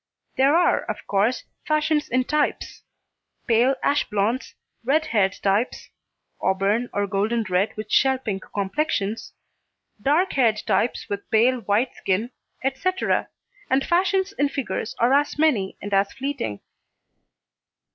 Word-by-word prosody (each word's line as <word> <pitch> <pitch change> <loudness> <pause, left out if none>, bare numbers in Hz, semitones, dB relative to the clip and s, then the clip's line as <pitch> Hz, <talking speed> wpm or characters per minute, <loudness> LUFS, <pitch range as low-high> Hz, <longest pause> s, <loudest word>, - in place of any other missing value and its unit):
There 275 +3 +4
are 345 0 +4
of - - -5
course 205 +5 +1 0.2
fashions 305 0 +1
in 255 +1 +2
types; 300 +3 -1 0.6
pale 240 +4 +3
ash 290 +1 +1
blonds, 210 +5 -1 0.3
red 300 +6 +2
haired 200 -9 +1
types 205 +5 0 0.5
(auburn 200 +5 +1
or 205 0 0
golden 210 +4 0
red 185 +4 0
with 215 0 -6
shell 265 0 +4
pink 205 -7 -4
complexions), 205 +1 -2 0.7
dark 315 - +2
haired 230 -5 +2
types 240 - 0
with 200 0 -5
pale 245 +3 +3
white 220 +4 0
skin, 210 +6 -1 0.3
etc., 275 +9 0 0.4
and 265 +1 +2
fashions 380 +2 +1
in 285 - +3
figures 275 -5 -4
are 240 +3 +3
as 290 +1 +2
many 255 -12 +1
and 205 0 -5
as 195 0 +2
fleeting. 265 - -4
245 Hz, 130 wpm, -23 LUFS, 205-285 Hz, 0.7 s, There